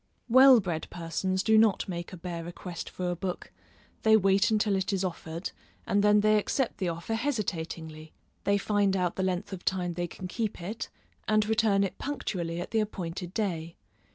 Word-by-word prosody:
Well 260 +1 +8
bred 175 -6 -3
persons 185 +3 -2
do 220 -1 +5
not 220 -3 +3
make 175 -2 -5
a 185 - -8
bare 170 -1 -5
request 175 0 -7
for 180 -1 -3
a - - -2
book; 180 +1 -5 0.5
they 220 0 +6
wait 195 +2 +3
until 210 -2 +2
it 190 +1 -1
is 195 -1 0
offered, 165 -1 -4 0.3
and 200 +1 +2
then 210 0 +5
they 215 0 +4
accept 255 +4 -1
the 185 -3 0
offer 170 +6 -4
hesitatingly; 165 - -3 0.3
they 200 0 +3
find 200 -1 +1
out 180 -2 0
the - - -2
length 185 +1 -1
of 185 - -7
time 180 -2 0
they 175 +1 -2
can 185 +2 -7
keep 220 +3 -3
it, 205 +6 -5 0.4
and 215 0 +3
return 215 -2 +3
it 195 - -3
punctually 175 -12 -3
at 175 - -5
the 225 - +2
appointed 180 -4 -4
day. 170 -6 -2
190 Hz, 185 wpm, -29 LUFS, 175-215 Hz, 0.5 s, Well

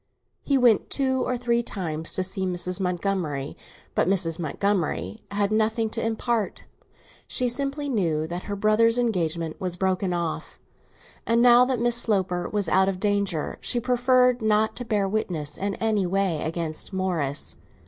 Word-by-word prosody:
He 280 - +1
went 240 -5 +3
two 260 -2 0
or 250 - -1
three 235 -1 +1
times 165 -8 -3
to 185 - 0
see 190 +1 -2
Mrs. 180 0 +1
Montgomery, 180 -6 -2 0.4
but - - +1
Mrs. 180 -4 +1
Montgomery 165 - -1
had 200 0 0
nothing 220 +1 +1
to 230 - -3
impart. 225 -1 -1 0.6
She 250 - +1
simply 275 +3 -2
knew 170 - 0
that 175 +2 -6
her 205 - -2
brother's 215 +3 +3
engagement 170 -8 -1
was 180 -2 -2
broken 185 0 0
off, 170 -2 -4 0.7
and 230 0 +3
now 245 +1 +7
that 255 -2 -1
Miss 240 0 +3
Sloper 190 -6 0
was 205 -3 -1
out 190 +3 +3
of 185 -1 -4
danger 200 -6 -1
she 245 - 0
preferred 250 0 +3
not 215 0 +2
to 245 - -5
bear 210 -3 0
witness 170 -8 -3
in 200 0 -2
any 215 -4 0
way 190 -4 0
against 160 +1 -4
Morris. 170 -7 -1
200 Hz, 160 wpm, -25 LUFS, 175-230 Hz, 0.7 s, now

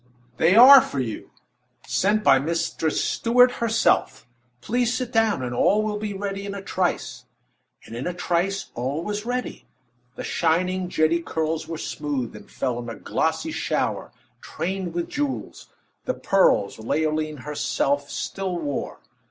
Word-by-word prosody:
"They 170 +4 +4
are 260 +4 +10
for 140 - -4
you 115 -4 -4 0.6
sent 210 +2 +1
by 135 -1 +6
Mistress 160 +1 -1
Stuart, 245 +2 +4
herself. 230 0 +1 0.3
Please 240 - 0
sit 250 -2 -3
down, 220 - +2
and 125 -1 -3
all 210 - +3
will 210 -1 -2
be 210 -1 -3
ready 200 0 -4
in 200 0 -5
a 200 - -6
trice." 185 -2 -2 0.6
And 115 - -9
in 125 +6 -4
a 180 - -2
trice 180 +3 -1
all 135 +7 -3
was 210 +3 -4
ready. 250 0 -4 0.5
The - - -6
shining, 180 +2 0
jetty 165 0 +2
curls 160 -1 -2
were 165 0 -5
smoothed, 145 -6 -4
and - - -13
fell 125 -3 -2
in 120 -1 -6
a 115 - -6
glossy - - -1
shower, - - -2 0.3
trained 185 -1 -4
with 175 -1 -2
jewels 290 -2 -4 0.4
the 255 - -1
pearls 190 - +2
Leoline 155 +5 -1
herself 140 0 -1
still 190 -2 -3
wore. 145 -4 -4
175 Hz, 150 wpm, -24 LUFS, 150-210 Hz, 0.6 s, are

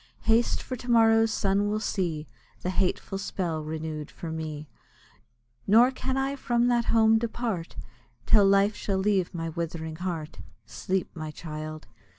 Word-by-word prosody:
Haste! 225 +2 +2
for 255 - -4
to 245 +2 -9
morrow's 225 -1 +5
sun 205 -1 +1
will 215 +1 0
see 170 -8 -2 0.4
The 180 - -1
hateful 190 +1 -1
spell 170 -5 -3
renewed 155 -1 -5
for 165 - -7
me; 155 -2 -5 1.0
Nor 235 +5 +6
can 260 0 -3
I 270 +1 0
from 240 -2 +1
that 240 -1 +2
home 225 -1 +4
depart, 225 -6 -3 0.5
Till 205 -3 +6
life 200 +1 +4
shall 195 -2 -2
leave 190 -2 +1
my 165 -2 -4
withering 160 -1 -4
heart. 170 -3 -4 0.3
Sleep, 185 -1 -3
my 155 -2 -5
child! 155 0 -7
195 Hz, 150 wpm, -27 LUFS, 160-225 Hz, 1.0 s, Nor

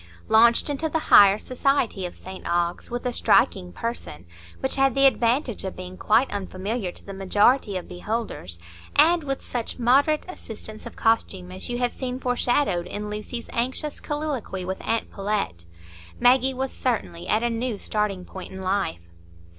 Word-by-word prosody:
Launched 235 +1 +5
into 295 +2 -1
the 320 - 0 0.2
higher 200 0 +9
society 250 -6 0
of 175 - -12
St 190 0 -10
Ogg's, 175 0 -1
with 240 +1 -4
a 250 - 0
striking 185 -5 +3
person, 230 - -5 0.3
which - - 0
had 270 -2 +3
the 275 0 +5
advantage 245 -1 +2
of 190 - -4
being 185 0 -8
quite 225 +7 +2
unfamiliar 195 +1 -3
to - - -11
the 195 - -7
majority 205 +3 +2
of 180 - -7
beholders, 180 - -4 0.4
and 340 0 +5
with 275 -1 -3
such 240 -2 -4
moderate 275 +5 +3
assistance 220 - -7
of - - -11
costume 190 -5 0
as 185 +5 -3
you 240 - -2
have 245 -1 0
seen 255 -1 -4
foreshadowed 245 -7 +1
in 210 +2 -5
Lucy's 215 +3 -5
anxious 260 +5 -2
colloquy 290 -11 -3
with 190 +1 -4
aunt 225 0 -1
Pullet, 195 - -2 0.5
Maggie 260 +1 +4
was 265 +1 -2
certainly 215 -9 -2
at 215 +2 +2
a 240 - +2
new 230 -1 -2
starting 200 -3 -2
point 190 - -9
in 190 - -8
life. 190 - -1
225 Hz, 165 wpm, -24 LUFS, 190-255 Hz, 0.5 s, higher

